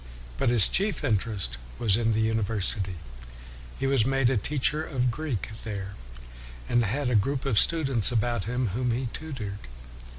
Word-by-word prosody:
But -, -, +1 dB
his 120 Hz, -5 st, +9 dB
chief 200 Hz, +2 st, 0 dB
interest 100 Hz, -, -2 dB, 0.2 s
was 105 Hz, -5 st, +2 dB
in 115 Hz, 0 st, +1 dB
the 110 Hz, -, 0 dB
university. 105 Hz, -3 st, 0 dB, 0.8 s
He 135 Hz, -, -3 dB
was 135 Hz, -4 st, +2 dB
made 135 Hz, 0 st, +1 dB
a -, -, +1 dB
teacher 150 Hz, +6 st, 0 dB
of 125 Hz, -5 st, -1 dB
Greek 140 Hz, -5 st, -4 dB
there, 100 Hz, -3 st, -6 dB, 0.7 s
and 120 Hz, 0 st, +2 dB
had 125 Hz, +5 st, -2 dB
a -, -, +1 dB
group 135 Hz, +7 st, 0 dB
of 120 Hz, -7 st, +3 dB
students 135 Hz, -9 st, +3 dB
about 120 Hz, -3 st, -1 dB
him 125 Hz, 0 st, -2 dB
whom 125 Hz, +6 st, -2 dB
he 120 Hz, +3 st, -1 dB
tutored. 120 Hz, -11 st, -6 dB
120 Hz, 160 wpm, -26 LUFS, 105-135 Hz, 0.8 s, his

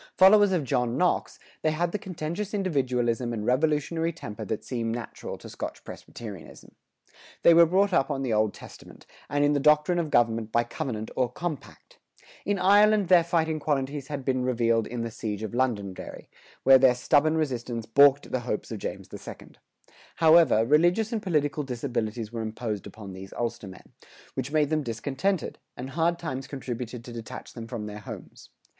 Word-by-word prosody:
Followers 205 Hz, +1 st, +7 dB
of 175 Hz, -5 st, +1 dB
John 125 Hz, -2 st, 0 dB
Knox, 180 Hz, 0 st, 0 dB, 0.2 s
they 155 Hz, -, +2 dB
had 170 Hz, +3 st, -1 dB
the 210 Hz, -, -2 dB
contentious 185 Hz, +1 st, -4 dB
individualism 125 Hz, -, 0 dB
and 105 Hz, -2 st, -4 dB
revolutionary 155 Hz, +5 st, +1 dB
temper 110 Hz, -9 st, -8 dB
that 110 Hz, +2 st, -3 dB
seem 115 Hz, -2 st, -2 dB
natural 120 Hz, 0 st, -6 dB
to -, -, -12 dB
Scotch -, -, -7 dB
Presbyterianism. 105 Hz, -8 st, -10 dB, 0.7 s
They 170 Hz, -, +8 dB
were 170 Hz, 0 st, +7 dB
brought 195 Hz, +3 st, +2 dB
up 135 Hz, -3 st, +2 dB
on 135 Hz, -2 st, -2 dB
the 125 Hz, -4 st, -1 dB
Old 110 Hz, -1 st, +2 dB
Testament, -, -, -14 dB, 0.2 s
and 145 Hz, 0 st, +2 dB
in 145 Hz, -, +3 dB
the 145 Hz, -, +2 dB
doctrine 150 Hz, +4 st, +3 dB
of 160 Hz, -3 st, -2 dB
government 115 Hz, -3 st, +1 dB
by 120 Hz, +1 st, +3 dB
covenant 120 Hz, -4 st, -5 dB
or 125 Hz, -2 st, 0 dB
compact. 160 Hz, 0 st, -7 dB, 0.5 s
In 205 Hz, 0 st, +1 dB
Ireland 205 Hz, +1 st, +4 dB
their 180 Hz, -2 st, +7 dB
fighting 160 Hz, -2 st, 0 dB
qualities 140 Hz, -1 st, -2 dB
had 140 Hz, -3 st, -5 dB
been 130 Hz, -2 st, 0 dB
revealed 115 Hz, -3 st, +1 dB
in 120 Hz, -1 st, -4 dB
the 115 Hz, -, -4 dB
siege 110 Hz, -1 st, -5 dB
of 110 Hz, -, -5 dB
Londonderry, 110 Hz, -7 st, -3 dB, 0.3 s
where 135 Hz, 0 st, +8 dB
their 130 Hz, -1 st, +5 dB
stubborn 155 Hz, +5 st, +2 dB
resistance 120 Hz, -6 st, -2 dB
balked 140 Hz, +4 st, +5 dB
the 130 Hz, -, 0 dB
hopes 120 Hz, -2 st, -4 dB
of 110 Hz, -, -4 dB
James -, -, -6 dB
II. -, -, -9 dB, 0.7 s
However, 160 Hz, -8 st, +5 dB
religious 175 Hz, -, +3 dB
and 220 Hz, -, -1 dB
political 150 Hz, -6 st, 0 dB
disabilities 120 Hz, -4 st, -3 dB
were 115 Hz, -1 st, -4 dB
imposed 110 Hz, -2 st, -4 dB
upon 100 Hz, -1 st, -10 dB
these 95 Hz, +1 st, -10 dB
Ulstermen, 105 Hz, -5 st, -5 dB, 0.4 s
which 130 Hz, +1 st, -4 dB
made 150 Hz, -1 st, +2 dB
them 155 Hz, -1 st, +2 dB
discontented, 140 Hz, -, -2 dB, 0.2 s
and 130 Hz, +2 st, -6 dB
hard 170 Hz, +4 st, +1 dB
times 135 Hz, -6 st, -5 dB
contributed 125 Hz, -3 st, -6 dB
to 120 Hz, -, -9 dB
detach 115 Hz, -1 st, -8 dB
them 115 Hz, -2 st, -8 dB
from 115 Hz, -3 st, -5 dB
their 105 Hz, 0 st, -7 dB
homes. 105 Hz, -, -10 dB
135 Hz, 175 wpm, -27 LUFS, 115-160 Hz, 0.7 s, They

